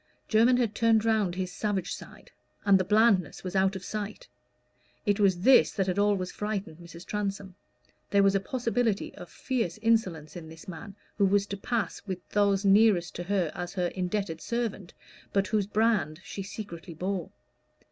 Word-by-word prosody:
Jermyn 235 +3 +4
had 235 -4 0
turned 225 -1 +3
round 215 -5 +1
his 185 -1 -3
savage 200 -4 -2
side, - - -11 0.3
and 195 -2 +6
the - - +2
blandness 210 -3 +3
was 185 0 -5
out 190 0 +2
of 190 - -7
sight. 210 -1 -5 0.8
It 205 0 +2
was 190 -4 +3
this 260 +5 +6
that 195 - 0
had 185 +1 -1
always 200 -3 +1
frightened 200 -6 -4
Mrs. 170 0 -11
Transome: 200 -2 -3 0.6
there 200 0 +4
was 195 0 +4
a 195 - +3
possibility 230 0 -1
of - - -11
fierce 230 -10 -2
insolence 190 -10 +1
in 165 -3 -8
this 160 0 -13
man 185 +2 -8 0.2
who 200 - +5
was 200 +1 +2
to 200 - -5
pass 215 -1 -2
with 185 -2 -5
those 200 -1 +2
nearest 195 -3 +4
to 175 - -5
her 185 -4 0
as 180 -2 -5
her 180 -2 0
indebted 180 -2 -3
servant, 230 -6 -3 0.4
but 195 0 +2
whose 205 -1 0
brand 210 -8 +1
she 195 - -6
secretly 185 -4 -8
bore. 185 +1 -3
195 Hz, 175 wpm, -28 LUFS, 180-215 Hz, 0.8 s, and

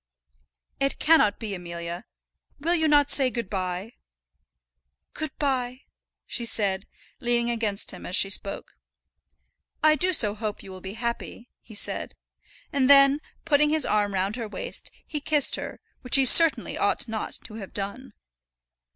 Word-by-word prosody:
"It 275 0 -1
cannot 305 -11 +3
be, 215 -3 -6
Amelia. 170 -1 -7 0.5
Will 330 +4 0
you 320 -2 +1
not 290 -1 +3
say 265 -2 +2
good 235 -5 -6
by?" 185 +3 -4 1.2
"Good 310 - -5
by," 255 -3 -2 0.4
she 240 - -1
said, 200 -4 +2 0.3
leaning 240 -2 0
against 220 -4 -2
him 180 - -11
as 180 - -2
she 195 - +5
spoke. 200 0 -4 1.0
"I 310 0 +6
do 365 +5 +1
so 215 - +3
hope 215 -1 -6
you 190 - -11
will 185 0 -11
be 190 +2 -8
happy," 235 +1 -6
he 220 - -15
said. - - -3 0.6
And 270 -2 +1
then, 275 +1 +6 0.2
putting 300 -1 +3
his 310 -2 +1
arm 205 -1 0
round 195 +4 -2
her 230 -3 -5
waist, 210 - -7 0.2
he 300 - -5
kissed 295 -1 +2
her; - - -7 0.2
which 250 - 0
he 270 -1 +5
certainly 330 +5 +8
ought - - -1
not 220 -1 -5
to 215 - -10
have 195 - -10
done. 215 +5 -6
235 Hz, 155 wpm, -25 LUFS, 200-280 Hz, 1.2 s, certainly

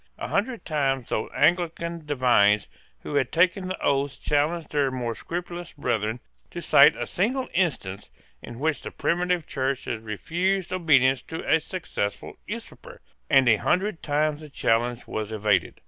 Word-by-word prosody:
A - - -5
hundred 230 +4 -1
times 135 -5 -1
those 110 - -2
Anglican 170 0 0
divines 120 -7 +3 0.3
who - - -7
had 140 -3 +1
taken 185 +2 +2
the 185 - -4
oaths 140 0 +1
challenged 150 +2 0
their 145 -2 +2
more 125 -3 -3
scrupulous 175 +5 -6
brethren 115 -4 -1 0.3
to - - -6
cite - - +6
a - - -3
single 250 +8 -1
instance 115 - -1 0.3
in 120 - -9
which 155 +3 -1
the - - -6
primitive 175 -1 0
Church 135 -1 -2
had 110 -1 -4
refused 180 - -1
obedience 135 -8 +4
to 160 +5 -7
a 160 - +4
successful 155 - -4
usurper; - - -8 0.3
and 135 -2 +5
a 110 -2 +6
hundred 185 - 0
times 150 0 0
the 155 -1 -11
challenge 120 -2 0
was 110 0 -4
evaded. 105 -4 0
145 Hz, 155 wpm, -25 LUFS, 120-175 Hz, 0.3 s, cite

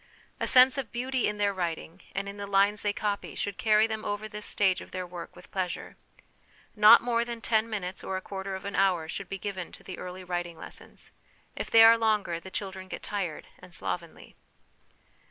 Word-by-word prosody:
A - - -1
sense 255 +2 +7
of 235 -6 -5
beauty 255 +1 0
in 210 - -2
their 205 -1 +1
writing 175 -1 -4
and 200 0 -2
in 200 +1 -7
the 200 0 -5
lines 200 +1 +3
they 205 - +1
copy 205 0 -3
should 200 -1 -3
carry 215 -1 +5
them 220 -1 -4
over 205 +1 -3
this 210 -1 -6
stage 190 -3 +2
of - - -11
their 185 0 -4
work 175 -1 -9
with 180 - -15
pleasure. 185 -2 -3 0.8
Not 215 +2 +9
more 235 -1 +1
than 235 -1 -6
ten 225 0 +1
minutes 190 -4 -4
or 190 - -2
a - - -5
quarter 195 0 -5
of 190 - -8
an 200 - -4
hour 180 -5 +2
should 190 +3 -6
be 195 - -4
given 190 -2 -5
to - - -13
the 185 - -8
early 185 +1 -7
writing 175 -2 -4
lessons. - - -10 0.4
If - - -4
they 225 0 +8
are 230 0 +8
longer 210 -6 +1
the 190 - -10
children 190 -1 -5
get - - -7
tired 190 -7 -3
and 180 -2 -9
slovenly. 170 -2 -5
200 Hz, 210 wpm, -28 LUFS, 185-215 Hz, 0.8 s, Not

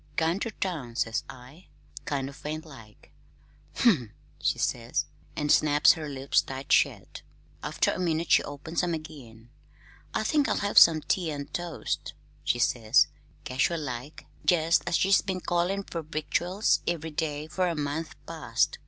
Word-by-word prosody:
'Gone 165 +4 +1
ter 230 - -2
town,' 160 - -4
says 115 -1 0
I, 135 +6 -13 0.4
kind 135 -2 -2
o' 140 - -8
faint 155 +2 -6
like. 115 -9 -15 0.7
'Umph!' 150 - +4 0.3
she - - +1
says, - - -1 0.3
an' 150 - -2
snaps 150 0 +6
her 155 -3 -6
lips 135 0 +1
tight 135 0 -7
shet. - - +2 0.4
After - - +1
a - - -4
minute 170 -2 -1
she - - +7
opens 150 +3 -3
'em 175 -2 0
again. 120 -7 -11 0.6
'I - - +1
think 295 -3 +2
I'll - - +2
have 205 0 +5
some 160 -2 +7
tea 175 +1 0
and 145 -2 -6
toast,' 175 -2 -4 0.3
she - - +1
says, 115 -2 +3 0.3
casual 140 +6 0
like, 130 +1 -6 0.2
jest 165 -1 +3
as 175 - +1
if - - +2
she'd 195 0 +4
been 190 -1 -1
callin' 180 +3 0
fer 170 -3 -5
victuals 170 +6 0
ev'ry 165 -2 -2
day 150 -1 -2
fer 180 +3 -1
a 170 - -2
month 150 +2 -3
past. - - -1
155 Hz, 160 wpm, -28 LUFS, 140-175 Hz, 0.7 s, she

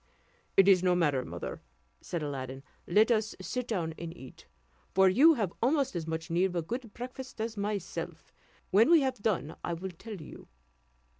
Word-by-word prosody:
"It 195 0 +7
is 190 -3 +6
no 180 -1 +3
matter, 145 -7 +2
mother," - - -6 0.4
said 170 -3 -4
Aladdin, 135 -2 -5 0.2
"let 215 +7 +4
us 220 -1 +1
sit 250 -1 -3
down 170 -7 -1
and 170 -1 -5
eat; 130 - -13 0.5
for 190 0 +6
you 290 - +6
have 205 -8 -1
almost 270 0 +2
as 165 -2 -3
much 160 +1 -4
need 175 +3 +3
of 185 -2 -2
a 170 - 0
good 235 +5 -5
breakfast 255 0 -8
as 225 +1 -2
myself; 205 -2 -4 0.4
when 215 +7 +5
we 335 -2 +7
have 260 -5 -1
done, 180 -8 -1
I 170 - -2
will 185 +3 -5
tell 210 +6 -9
you." 155 - -11
190 Hz, 180 wpm, -30 LUFS, 165-230 Hz, 0.5 s, It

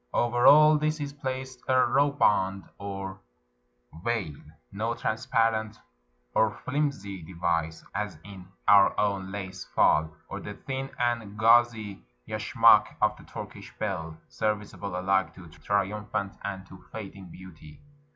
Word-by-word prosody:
Over 120 +1 +3
all 150 +1 +8
this 155 +1 0
is 145 -1 -4
placed 130 -2 -5
a 130 - +3
ruh 145 +1 +3
band 100 -8 +1 0.2
or 95 -1 -6 0.8
veil 110 -9 -1 0.2
— - - -43
no 115 +1 0
transparent 115 -2 0 0.6
or 110 -1 +2
flimsy 130 -10 -2
device, 85 -1 -2
as 100 -4 -3
in 95 -2 -11 0.2
our 100 0 +6
own 100 -2 0
lace 95 -2 -6
"fall," 80 +1 +3 0.2
or - - -6
the - - -7
thin 135 0 -5
and 115 -4 -1
gauzy 115 -2 +3 0.3
yashmak - - +4
of - - +2
the - - -16
Turkish - - -9
belle, 80 -6 -4
serviceable 105 -3 -3
alike 95 -2 +1
to 90 -3 -12
triumphant 100 +2 -2
and 95 -1 -5
to 95 -1 -14
fading 100 -3 -8
beauty. 80 -4 -13
100 Hz, 130 wpm, -27 LUFS, 95-120 Hz, 0.8 s, all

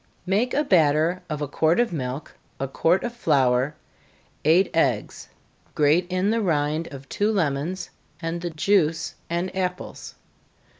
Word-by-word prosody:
Make 210 +7 +1
a 295 - +3
batter 165 - +3
of 150 -1 -3
a - - -2
quart 160 - +2
of 240 -6 +1
milk, 130 -1 -5 0.2
a 135 - -1
quart 165 +7 +1
of 240 - -3
flour, 130 - +2 0.7
eight 170 +5 +4
eggs 130 -10 0 0.5
grate 155 +4 +3
in 185 +3 +1
the 230 0 +1
rind 155 -3 0
of 140 -1 -10
two 210 +2 0
lemons, 170 -1 -1 0.3
and 165 0 -3
the 175 - -3
juice 165 -1 +1 0.2
and 175 +3 -2
apples. 180 -1 -4
165 Hz, 145 wpm, -24 LUFS, 145-185 Hz, 0.7 s, eight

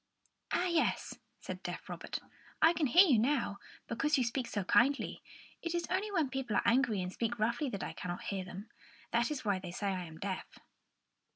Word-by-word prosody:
"Ah, 355 - +2
yes," 340 -3 0 0.2
said - - -7
deaf - - -5
Robert; - - -4 0.4
"I 325 +2 +6
can 315 -3 +1
hear 350 +10 +8
you 255 -8 +5
now, 235 -4 +1 0.3
because 300 +5 +1
you 255 - +3
speak 240 +1 -1
so 205 - -2
kindly. 265 +9 +3 0.4
It 335 0 -2
is 340 -1 0
only 390 +3 +1
when 320 -9 +1
people 265 -5 -2
are - - +2
angry 230 -5 +3
and 180 +1 -5
speak 235 0 -1
roughly 235 +6 +1
that 200 -5 -4
I - - -4
cannot 175 0 -5
hear 195 -2 -2
them. 185 +3 -9 0.4
That 235 0 +2
is 295 -6 -4
why 200 -2 +2
they 185 -1 -7
say 200 +3 -2
I 180 -1 -3
am 160 -1 -10
deaf." 190 +2 -5
235 Hz, 200 wpm, -33 LUFS, 200-300 Hz, 0.4 s, hear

